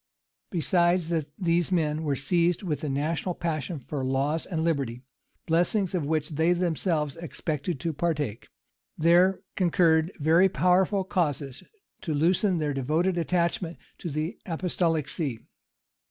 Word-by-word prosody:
Besides 175 Hz, 0 st, +2 dB
that 160 Hz, -4 st, -1 dB
these 175 Hz, -2 st, +1 dB
men 155 Hz, -3 st, +1 dB
were 145 Hz, -3 st, 0 dB
seized 170 Hz, +6 st, +1 dB
with 155 Hz, -6 st, -2 dB
the 150 Hz, -, -3 dB
national 160 Hz, +6 st, -1 dB
passion 165 Hz, 0 st, -3 dB
for 135 Hz, +1 st, -5 dB
laws 135 Hz, +5 st, 0 dB
and 160 Hz, -3 st, -2 dB
liberty, 135 Hz, -7 st, -1 dB, 0.4 s
blessings 175 Hz, +4 st, +1 dB
of 165 Hz, -6 st, -1 dB
which 155 Hz, -1 st, 0 dB
they 160 Hz, +3 st, +2 dB
themselves 165 Hz, -4 st, 0 dB
expected 160 Hz, -2 st, -3 dB
to 165 Hz, -2 st, -1 dB
partake, 145 Hz, -8 st, -2 dB, 0.5 s
there 175 Hz, +4 st, +4 dB
concurred 170 Hz, -2 st, +3 dB
very 165 Hz, +5 st, +4 dB
powerful 185 Hz, +4 st, +2 dB
causes 145 Hz, -8 st, -2 dB, 0.4 s
to 160 Hz, -5 st, -2 dB
loosen 180 Hz, +5 st, +2 dB
their 150 Hz, -2 st, -1 dB
devoted 155 Hz, +8 st, 0 dB
attachment 170 Hz, 0 st, 0 dB, 0.2 s
to 170 Hz, -, -4 dB
the 155 Hz, +3 st, -3 dB
apostolic 165 Hz, -3 st, 0 dB
see. 140 Hz, -9 st, -3 dB
165 Hz, 135 wpm, -27 LUFS, 150-175 Hz, 0.5 s, there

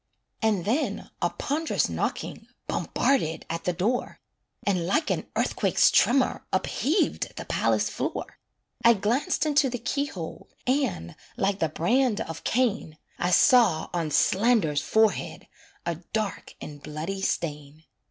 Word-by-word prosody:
And 210 Hz, -6 st, +1 dB
then 235 Hz, -1 st, -1 dB
a 175 Hz, -, +2 dB
pond'rous 310 Hz, -, -1 dB
knocking -, -, -3 dB, 0.2 s
Bombarded 165 Hz, -, 0 dB
at 165 Hz, 0 st, -4 dB
the 180 Hz, -, +2 dB
door, 210 Hz, +9 st, -1 dB, 0.5 s
And 180 Hz, -4 st, +1 dB
like 305 Hz, -, +1 dB
an -, -, -2 dB
earthquake's -, -, +3 dB
tremor 255 Hz, 0 st, +3 dB
Upheaved 320 Hz, +9 st, 0 dB
the -, -, -6 dB
palace -, -, +1 dB
floor. -, -, -4 dB, 0.4 s
I 235 Hz, 0 st, +7 dB
glanced 220 Hz, +10 st, 0 dB
into 290 Hz, -2 st, +3 dB
the 245 Hz, -, -3 dB
key 280 Hz, +4 st, -1 dB
hole, 175 Hz, -, -8 dB, 0.2 s
And, 250 Hz, -, -1 dB, 0.2 s
like 195 Hz, 0 st, 0 dB
the 160 Hz, -, +1 dB
brand 225 Hz, -, +1 dB
of 165 Hz, -5 st, -5 dB
Cain, 225 Hz, -10 st, 0 dB, 0.2 s
I 175 Hz, -, +1 dB
saw 215 Hz, -, +4 dB
on 170 Hz, -3 st, -1 dB
Slander's 190 Hz, -4 st, +3 dB
forehead 220 Hz, -1 st, +1 dB, 0.4 s
A 170 Hz, -, 0 dB, 0.2 s
dark 215 Hz, -2 st, -3 dB
and 145 Hz, -1 st, -9 dB
bloody 160 Hz, +7 st, -5 dB
stain. 150 Hz, -4 st, -3 dB
205 Hz, 135 wpm, -26 LUFS, 165-250 Hz, 0.5 s, I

